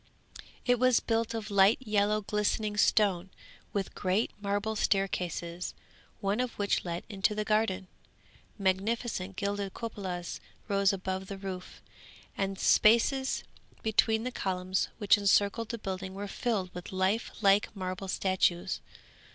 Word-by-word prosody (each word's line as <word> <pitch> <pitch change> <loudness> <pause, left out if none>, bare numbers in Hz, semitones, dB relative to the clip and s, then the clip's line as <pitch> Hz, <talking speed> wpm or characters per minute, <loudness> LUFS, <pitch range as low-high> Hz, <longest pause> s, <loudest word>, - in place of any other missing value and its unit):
It 245 -2 +3
was 255 -1 +5
built 230 0 -1
of 215 -2 -5
light 200 +2 +6
yellow 210 -3 +1
glistening 210 +1 0
stone, 195 -4 +3 0.4
with 200 -2 -2
great 190 +5 0
marble 205 +2 -1
staircases, 180 -4 -1 0.5
one 200 +3 0
of 250 -2 -1
which 205 -1 0
led 170 -1 -4
into 205 0 0
the 215 0 -1
garden. 210 -3 +1 0.7
Magnificent 195 0 -1
gilded 200 0 -2
cupolas 190 -6 -5 0.3
rose 200 -1 +3
above 190 0 -3
the 195 - -6
roof, 190 -2 -7 0.5
and 195 0 -2
the - - -7
spaces 265 +5 +4 0.4
between 220 0 +2
the 255 - -2
columns 185 -3 -1
which 205 -1 +4
encircled 205 +2 +2
the 235 - -3
building 190 -2 -5
were 205 +1 -4
filled 200 -4 -2
with 180 0 -7
life 190 +4 +1
like 200 -1 +4
marble 185 0 -4
statues. 185 -1 +1
200 Hz, 135 wpm, -30 LUFS, 190-215 Hz, 0.7 s, light